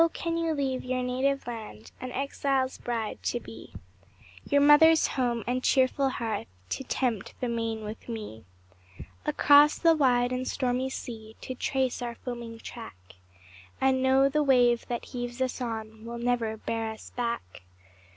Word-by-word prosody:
can 335 -1 -2
you 335 -1 0
leave 270 -4 -1
your 255 0 -1
native 265 +2 0
land 215 - -8
An 255 - -5
exile's 270 -1 -1
bride 230 -3 -3
to 240 - -1
be; 115 - -12 0.7
Your 285 - +4
mother's 310 +2 +7
home, 240 -4 -1
and 250 +1 -1
cheerful 270 +1 +3
hearth, 225 -5 -3 0.2
To - - -3
tempt 240 -5 -2
the 250 - -1
main 230 -2 -2
with 215 +3 -8
me; 210 - -6 0.8
Across 290 +1 +6
the 330 -1 +5
wide 245 -4 +3
and 255 0 -2
stormy 255 0 0
sea 220 -4 -7
To 255 - -5
trace 260 0 -1
our 240 -1 -4
foaming 235 -2 -7
track, 225 - -9 0.8
And 265 -1 +3
know 265 +1 +5
the 300 +2 +1
wave 245 -4 +4
that 240 -1 -3
heaves 245 -1 -5
us 260 0 -1
on 220 -2 -5
Will 235 +1 -6
never 235 -2 0
bear 225 0 -3
us 220 0 -9
back? 235 - -3
245 Hz, 155 wpm, -28 LUFS, 230-265 Hz, 0.8 s, mother's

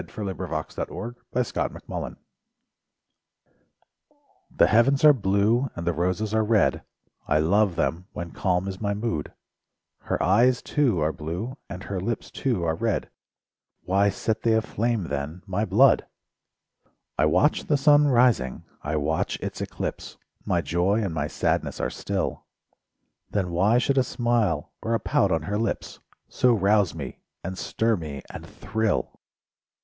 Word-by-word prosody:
SONGS - - -16
AND 100 -3 -3
DREAMS 80 -4 -4
Nature 120 +1 -5 0.5
and - - -3
Woman - - -5 2.3
The - - +4
heavens 135 +6 +4
are 150 - +9
blue 110 +3 +2
and 85 - -5
the 85 - +1
roses 90 +6 -1
are 110 0 +3
red, 105 -1 +2 0.5
I 75 - +3
love 95 +4 +3
them 90 +3 -1
when 85 -1 -6
calm 90 0 0
is 95 +1 -6
my 100 -1 0
mood; 100 -9 -3 0.7
Her - - -2
eyes, 120 +9 +3
too, 130 - +1
are 80 +1 +1
blue, 90 +12 -5
and 95 0 -7
her 100 -2 -4
lips, 110 +5 -3
too, 120 -10 -1
are 80 -1 +1
red— 110 +5 -1 0.7
Why 100 +2 +3
set 110 +3 -2
they 115 -1 +3
aflame 110 0 0
then 75 +5 -4
my 100 +2 -1
blood? 110 +8 +4 1.1
I 75 - +5
watch 90 - +2
the 145 - +2
sun 145 +1 +5
rising, 120 - +2 0.2
I 75 +2 -2
watch 75 +1 -1
its - - -5
eclipse— - - -5 0.3
My 85 - +1
joy 90 +8 +1
and 95 -5 -2
my 75 -2 -1
sadness - - -1
are - - -1
still; - - -3 0.8
Then 95 -4 -1
why 100 +7 +3
should 135 +2 +2
a - - +4
smile 120 -11 0
or 115 +1 0
a - - 0
pout - - +1
on 80 -2 +1
her 105 +6 -2
lips 115 - -3 0.3
So 125 -2 +3
rouse 100 -3 +2
me, 70 -5 -7 0.2
and 95 +1 -4
stir 115 +4 0
me, 75 -7 -6
and - - -8
thrill? 110 -1 -2
100 Hz, 155 wpm, -25 LUFS, 85-115 Hz, 2.3 s, are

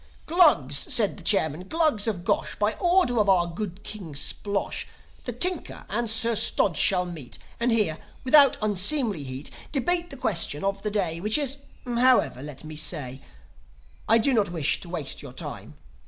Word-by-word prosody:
"Glugs," 220 - +3
said 215 -4 +2
the - - -11
chairman. 175 -3 0
"Glugs 310 -9 +1
of 190 -5 -3
Gosh; - - -1
By 210 +1 0
order 350 -10 +2
of 205 -2 +2
our 180 -3 +4
good 180 +2 -7
King 185 -9 -7
Splosh, 200 +7 -1 0.4
The 245 - -2
Tinker 350 +8 0
and 235 +3 -2
Sir 230 +1 +2
Stodge 200 -4 +2
shall 180 +3 +2
meet, 160 -8 -7 0.2
And 235 +1 +1
here, 210 -9 0 0.2
without 280 +1 +5
unseemly 210 - +3
heat, 130 +2 -5 0.2
Debate 345 +5 0
the 275 - -8
question 170 - 0
of 195 0 -2
the 210 - -2
day, 180 -6 -2
Which 210 +5 +2
is 280 -2 +1 0.3
However, 245 - +2
let 145 -1 -9
me 155 0 -9
say 140 -4 -2 0.9
"I 225 - +6
do 265 +4 +1
not 210 -6 +1
wish 165 -5 0
to 175 - -9
waste 160 -6 -3
your - - -11
time. - - -7
205 Hz, 170 wpm, -25 LUFS, 165-245 Hz, 0.9 s, I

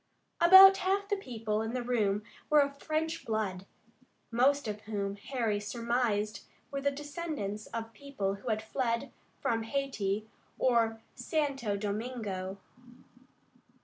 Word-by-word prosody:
About 380 +3 +10
half 395 +2 0
the 410 - +2
people 225 - -3
in 225 +2 -3
the 250 - -1
room 215 -4 +1 0.3
were 300 - +6
of 280 0 -2
French 320 +1 -2
blood, 200 -4 -2 0.6
most 270 +3 +3
of 210 0 -4
whom 200 -2 -2
Harry 220 -1 -1
surmised 215 0 -1 0.3
were 275 0 -3
descendants 280 - -3
of 225 0 -6
people 245 -8 -3
who 250 - -5
had 215 0 0
fled 235 +2 -1 0.3
from 225 -1 +1
Hayti 220 -5 -2 0.3
or 230 -3 +2
Santo 270 -5 -1
Domingo. 205 -3 -4
230 Hz, 120 wpm, -31 LUFS, 210-280 Hz, 0.6 s, About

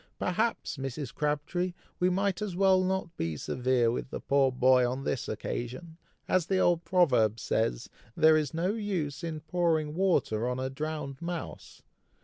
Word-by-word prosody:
"Perhaps, 215 0 -1
Mrs. 135 -1 -5
Crabtree, 150 +5 -1 0.2
we 180 - +3
might 195 +1 0
as 205 -4 -3
well 190 0 +4
not 185 -2 -2
be 80 -2 -2
severe 125 - +1
with 125 - -4
the - - -5
poor 140 -1 +2
boy 130 0 +4
on 125 +2 -1
this 135 - -2
occasion. 130 - -5 0.3
As 185 -3 +2
the 190 - +1
old 175 -2 +3
proverb 125 - +3
says, 110 - -1 0.3
'there 160 0 +6
is 150 -3 +1
no 175 +5 0
use 180 -10 -3
in 160 -2 -4
pouring 160 -1 0
water 155 - +1
on 125 0 -2
a 130 0 -2
drowned 150 -1 -5
mouse.' 170 0 -6
155 Hz, 160 wpm, -29 LUFS, 130-180 Hz, 0.3 s, there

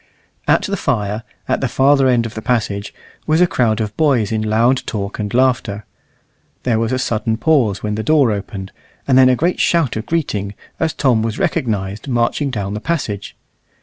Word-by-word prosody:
At - - +3
the 200 0 -2
fire, 105 - -1 0.3
at - - 0
the - - +1
farther 135 0 +3
end 120 -2 +2
of 115 - -6
the 110 - -6
passage, 105 -4 -1 0.4
was 155 +1 +3
a 180 - +6
crowd 115 -9 +1
of 105 -1 -3
boys 130 -10 +2
in 110 -1 0
loud 115 +4 +2
talk 100 -1 -4
and 105 -1 -3
laughter. 125 -5 +1 0.8
There 115 -3 +1
was 115 +1 0
a 130 - +1
sudden 110 -3 -1
pause 120 -9 +2
when 105 -1 -1
the 110 - -2
door 140 0 +3
opened, 100 -1 -5 0.4
and 135 - +3
then 130 0 +7
a 130 - +4
great 170 +8 0
shout 165 -8 +2
of 110 +1 -4
greeting, 105 -12 -2 0.2
as 160 -1 +1
Tom 125 -6 +2
was 110 -1 -2
recognized 105 -1 -2
marching 120 +3 0
down 100 -5 -3
the 105 - -3
passage. 120 -12 -3
115 Hz, 190 wpm, -18 LUFS, 105-135 Hz, 0.8 s, then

